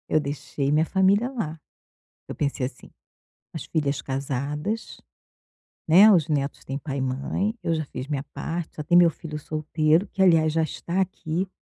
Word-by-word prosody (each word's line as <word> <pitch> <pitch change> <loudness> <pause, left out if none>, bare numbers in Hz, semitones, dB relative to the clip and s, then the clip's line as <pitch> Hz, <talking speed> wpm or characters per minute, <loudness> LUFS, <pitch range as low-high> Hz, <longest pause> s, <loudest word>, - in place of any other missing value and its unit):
Eu 155 - +3
deixei 140 -1 -3
minha 155 +2 +3
família 195 +6 +3
lá. 165 - -4 0.7
Eu - - -5
pensei 140 -3 -1
assim: 125 - -11 0.6
"As 160 - -6
filhas 145 -3 -1
casadas, 140 - -3 0.9
né, 190 +7 +8
os 170 -7 +4
netos 140 -2 -1
têm 135 - -3
pai 140 -1 -5
e - - -1
mãe, 135 - -1
eu 165 - +1
já 155 -1 -1
fiz 130 -1 -7
minha 140 -2 -2
parte. 165 0 -4
Só 150 - -5
tem 175 +4 +4
meu 175 -1 +7
filho 155 -1 -7
solteiro, 155 +4 +1
que 190 - -4
aliás 165 -4 +5
já 160 0 +2
está 170 +3 -2
aqui". 185 -1 -2
155 Hz, 170 wpm, -25 LUFS, 140-175 Hz, 0.9 s, né